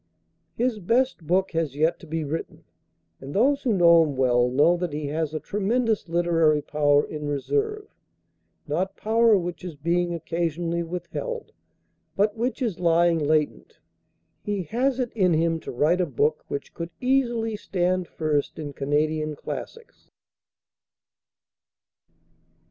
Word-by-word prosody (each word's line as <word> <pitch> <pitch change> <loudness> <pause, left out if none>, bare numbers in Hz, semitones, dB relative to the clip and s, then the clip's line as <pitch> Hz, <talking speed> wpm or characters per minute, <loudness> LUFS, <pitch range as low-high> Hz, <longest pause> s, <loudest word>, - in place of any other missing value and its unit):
His 240 -2 0
best 230 - 0
book 185 +2 +2
has 160 -5 -1
yet 155 +3 +1
to 165 - -13
be 160 +1 -2
written, 150 +3 -5 0.6
and 135 +2 -8
those 275 +7 +3
who 250 - 0
know 170 -4 +6
him 145 -4 -1
well, 125 -1 +3
know 150 +7 +4
that 175 -3 -3
he 150 0 -3
has 155 0 -2
a 155 - -3
tremendous 215 +1 -1
literary 165 -3 +2
power 145 -1 +2
in 150 -1 -6
reserve, 420 - -1 0.8
not 185 +6 -2
power 225 0 +4
which 175 0 -4
is 175 -4 -6
being 170 +3 0
occasionally 170 +1 -2
withheld, 180 - -5 0.6
but 205 +1 +2
which 250 +4 -2
is 220 -8 -2
lying 170 -1 +3
latent. 150 0 0 0.7
He 205 -2 -2
has 255 - 0
it 245 -2 -2
in 185 -6 +2
him 165 +1 +1
to - - -7
write 160 +8 +2
a 180 - 0
book 150 +3 0
which 140 - -5
could 170 0 -5
easily 240 -4 +1
stand 185 -2 -1
first 150 -3 -1
in 145 -2 -6
Canadian 155 +2 0
classics." 460 - -8
170 Hz, 140 wpm, -25 LUFS, 155-210 Hz, 0.8 s, know